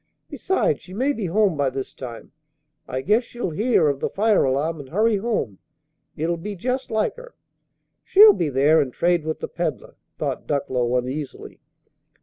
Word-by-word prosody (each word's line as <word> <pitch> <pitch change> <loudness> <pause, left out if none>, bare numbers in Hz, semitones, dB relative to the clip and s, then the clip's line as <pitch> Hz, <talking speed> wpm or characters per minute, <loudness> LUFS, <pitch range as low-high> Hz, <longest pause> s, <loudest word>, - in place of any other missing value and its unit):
Besides, 370 - 0
she 185 - -11
may 265 +6 +1
be 215 -8 -3
home 195 0 +2
by 140 -2 +1
this 130 0 -6
time. 120 -3 -9 0.6
I 130 0 -3
guess 210 - +2
she'll 240 -6 -5
hear 215 0 +2
of 140 -2 0
the - - -1
fire 215 +1 +2
alarm 145 +5 0
and 135 -2 -10
hurry 215 +5 +2
home: 195 - -2 0.6
it'll 170 +3 -1
be 205 +5 -6
jest 255 +7 -3
like 220 - -1
her. - - -12 0.7
She'll 420 +2 +8
be 165 - -1
there, 145 +4 +4
and 130 - -2
trade 170 +2 +1
with 155 - -3
the - - -3
peddler!" - - -4 0.2
thought - - -3
Ducklow, 125 -4 0
uneasily. 130 +3 -5
165 Hz, 170 wpm, -23 LUFS, 135-220 Hz, 0.7 s, She'll